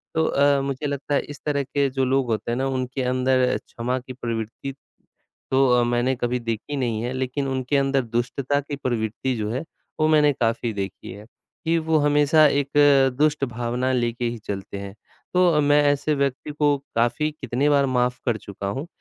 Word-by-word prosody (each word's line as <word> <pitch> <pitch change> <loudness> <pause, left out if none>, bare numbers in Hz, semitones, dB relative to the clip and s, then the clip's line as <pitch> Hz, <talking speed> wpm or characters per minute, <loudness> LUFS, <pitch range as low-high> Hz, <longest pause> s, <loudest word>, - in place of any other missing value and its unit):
तो 160 - +2
अ, 140 0 +3
मुझे 140 +2 -3
लगता 140 0 -2
है - - +2
इस 145 - -9
तरह 145 -2 0
के 140 +1 0
जो 130 0 0
लोग 135 +1 +2
होते 110 +2 -2
हैं 120 - 0
ना 135 +1 0
उनके 130 0 -2
अंदर 130 0 +2
अ, - - 0
क्षमा 125 +2 -4
की 130 +1 -10
प्रवृत्ति 115 +2 -5 0.8
तो 135 0 +4
अ, 120 - +3
मैंने 120 +2 +1
कभी 120 +1 -1
देखी 115 +5 -4
नहीं 115 -4 -1
है, 125 - -2
लेकिन 130 +2 -2
उनके 130 +1 0
अंदर 135 0 +2
दुष्टता 130 +3 0
की 145 +1 -6
प्रवृत्ति 125 -1 -2
जो 105 0 -2
है 130 +6 -2 0.4
वो 155 - +3
मैंने 150 -2 +5
काफ़ी 115 -1 -1
देखी 95 -2 -5
है, 105 +2 -10 0.4
कि 165 +1 +2
वो 160 0 +1
हमेशा 145 +1 +4
एक 140 -1 0 0.5
दुष्ट 150 -1 +2
भावना 120 +1 -2
लेके 120 0 -1
ही 120 0 -2
चलते 100 0 -5
हैं। 100 0 -7 0.4
तो 175 -4 +4
मैं 145 +1 +4
ऐसे 145 +2 0
व्यक्ति 140 +1 -2
को 145 -1 +2 0.2
काफ़ी 120 +7 +1
कितनी 145 -1 -1
बार 140 -1 +4
माफ़ 125 -1 0
कर 120 -3 +1
चुका 100 -1 -7
हूँ 135 +11 -4
130 Hz, 195 wpm, -23 LUFS, 120-145 Hz, 0.8 s, मैंने